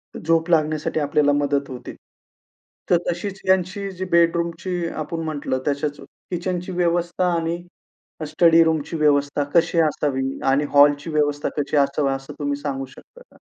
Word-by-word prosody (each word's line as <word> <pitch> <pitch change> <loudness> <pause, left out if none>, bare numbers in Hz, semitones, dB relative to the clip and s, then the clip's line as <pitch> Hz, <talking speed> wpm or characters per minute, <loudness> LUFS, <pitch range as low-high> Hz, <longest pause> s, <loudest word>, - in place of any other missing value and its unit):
झोप 165 +1 0
लागण्यासाठी 155 -1 +1
आपल्याला 145 0 +2
मदत 145 -1 0
होते. 125 -2 -8 1.0
तर 175 - +5
तशीच 195 +3 -4
ह्यांची 190 +1 +1
जी 185 0 -5
बेडरूमची 170 +1 +1 0.2
आपण 165 +2 -5
म्हटलं 145 -4 -2
त्याच्याच, 145 0 -2
किचनची 180 +1 -5
व्यवस्था 175 0 0
आणि 170 +1 -2 0.7
स्टडीरूमची 165 0 +3
व्यवस्था 145 -1 +2
कशी 170 0 +3
असावी 135 -3 -2
आणि 140 +2 +3
हॉलची 145 +2 +5
व्यवस्था 145 -2 0
कशी 145 +1 0
असावी 140 0 +2
असं 135 0 -7
तुम्ही 145 -1 -1
सांगू 135 -2 -3
शकता 315 - -17
का? - - -20
155 Hz, 135 wpm, -22 LUFS, 145-170 Hz, 1.0 s, तर